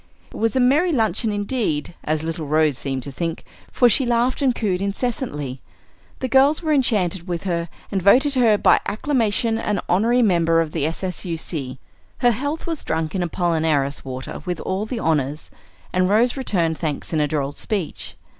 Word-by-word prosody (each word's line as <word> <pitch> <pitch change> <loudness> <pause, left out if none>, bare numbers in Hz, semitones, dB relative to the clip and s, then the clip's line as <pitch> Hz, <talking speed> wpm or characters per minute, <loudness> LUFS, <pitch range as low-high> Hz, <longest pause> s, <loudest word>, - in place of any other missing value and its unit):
It - - -9
was 225 +1 0
a - - +3
merry 290 +8 +3
luncheon 220 - +1
indeed, 205 - -2
as 155 0 -1
little 160 -1 -4
Rose 155 -1 +2
seemed 135 -1 -3
to 140 - -5
think, 165 +3 -4 0.3
for 245 - +4
she 255 +3 +3
laughed 240 +2 +1
and 260 -3 +2
cooed 190 -4 -1
incessantly. 200 - -3 0.6
The 260 - 0
girls 275 +5 +4
were 310 -1 +1
enchanted 195 - +1
with 175 -2 -3
her, 170 -3 -2 0.2
and 195 - 0
voted 260 - +5
her 235 -5 +4
by - - +4
acclamation 225 -1 0
an 210 -4 -1
honorary 230 +7 +3
member 165 -5 +3
of 165 -2 0
the 155 -2 -1
S.S.U.C. 165 -6 -4 0.4
Her 245 - +4
health 285 +7 -3
was 330 -3 -4
drunk 160 -1 -2
in 190 - -1
Apollinaris 160 -5 0
water 130 -1 -6
with 180 -3 -3
all 195 +3 -2
the 245 - -4
honors, 150 -6 -1 0.4
and 185 0 +2
Rose 230 +4 +3
returned 175 - 0
thanks 155 0 -3
in 155 - +2
a 150 - +2
droll 140 -2 -1
speech. 190 +3 -4
185 Hz, 175 wpm, -22 LUFS, 160-240 Hz, 0.6 s, voted